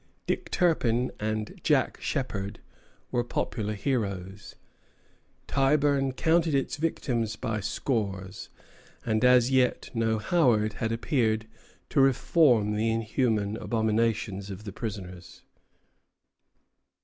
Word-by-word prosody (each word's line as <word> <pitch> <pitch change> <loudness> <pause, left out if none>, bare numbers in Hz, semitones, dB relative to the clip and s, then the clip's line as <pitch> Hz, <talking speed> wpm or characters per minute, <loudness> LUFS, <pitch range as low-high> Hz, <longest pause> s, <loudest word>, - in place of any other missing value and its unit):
Dick - - -2
Turpin 125 -9 +1
and 110 0 -3
Jack - - +1
Sheppard 105 -6 -3 0.5
were 120 - +1
popular 110 -2 -3
heroes. 100 -4 -3 0.9
Tyburn 140 -1 +2
counted 160 +1 +2
its 135 +1 -1
victims 120 -8 -1
by 110 -2 -3
scores; 100 -4 -3 0.6
and 110 0 +1
as 125 0 +5
yet 130 -2 +1
no 115 -1 +1
Howard 110 -4 +2
had 110 -1 0
appeared 115 -2 0 0.4
to 140 - +3
reform 130 -5 +3
the 110 +2 +1
inhuman 110 -2 0
abominations 110 -3 -1
of 95 +1 -7
the 100 -3 -7
prisons. 95 -6 -7
115 Hz, 100 wpm, -27 LUFS, 105-130 Hz, 0.9 s, as